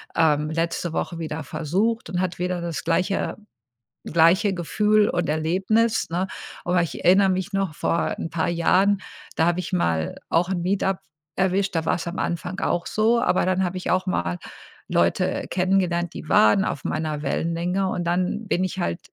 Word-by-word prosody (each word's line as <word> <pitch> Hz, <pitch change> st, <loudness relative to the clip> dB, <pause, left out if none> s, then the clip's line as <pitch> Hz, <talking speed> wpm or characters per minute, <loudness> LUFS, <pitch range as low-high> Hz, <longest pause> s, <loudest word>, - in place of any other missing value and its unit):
ähm, 150 Hz, -2 st, +2 dB
letzte 165 Hz, +1 st, -2 dB
Woche 170 Hz, -, -2 dB
wieder 160 Hz, -1 st, -4 dB
versucht 185 Hz, +11 st, -1 dB
und 180 Hz, 0 st, -1 dB
hatte 180 Hz, -1 st, -2 dB
wieder 180 Hz, -1 st, -1 dB
das 170 Hz, -2 st, -4 dB
gleiche 185 Hz, +4 st, 0 dB, 0.7 s
gleiche 170 Hz, +5 st, +4 dB
Gefühl 210 Hz, +4 st, +2 dB
und 175 Hz, -2 st, -1 dB
Erlebnis, 190 Hz, +10 st, +1 dB
ne, 180 Hz, +3 st, -1 dB, 0.4 s
aber 175 Hz, 0 st, +2 dB
ich 165 Hz, -5 st, -4 dB
erinnere 190 Hz, +2 st, +6 dB
mich 190 Hz, +1 st, -2 dB
noch, 195 Hz, -5 st, -1 dB
vor 170 Hz, -, 0 dB
'n -, -, -4 dB
paar 170 Hz, 0 st, 0 dB
Jahren, 190 Hz, +4 st, +3 dB, 0.3 s
da 160 Hz, -, +2 dB
habe 175 Hz, +1 st, +1 dB
ich -, -, -7 dB
mal 80 Hz, -, 0 dB
auch 170 Hz, +2 st, +2 dB
'n 180 Hz, -2 st, -1 dB
Meet-Up 190 Hz, 0 st, 0 dB, 0.4 s
erwischt, 195 Hz, +1 st, +1 dB
da 165 Hz, -1 st, 0 dB
war‘s 170 Hz, +1 st, -1 dB
am 170 Hz, -, -4 dB
Anfang 180 Hz, +3 st, -3 dB
auch 175 Hz, -, 0 dB
so, 230 Hz, +2 st, +2 dB
aber 185 Hz, -, +2 dB
dann 185 Hz, 0 st, +1 dB
habe 185 Hz, 0 st, -2 dB
ich 180 Hz, -, -2 dB
auch 185 Hz, +1 st, +1 dB
mal 85 Hz, -, -1 dB, 0.5 s
Leute -, -, +1 dB
kennengelernt, 180 Hz, -2 st, +1 dB
die 155 Hz, -, -7 dB
waren 110 Hz, -, +5 dB
auf 145 Hz, -, -4 dB
meiner 155 Hz, -2 st, -2 dB
Wellenlänge 170 Hz, +6 st, -1 dB
und 175 Hz, -, -2 dB
dann 180 Hz, +5 st, -1 dB
bin 185 Hz, -1 st, +1 dB
ich 185 Hz, +1 st, -3 dB
halt 85 Hz, -, -1 dB
180 Hz, 175 wpm, -24 LUFS, 165-190 Hz, 0.7 s, erinnere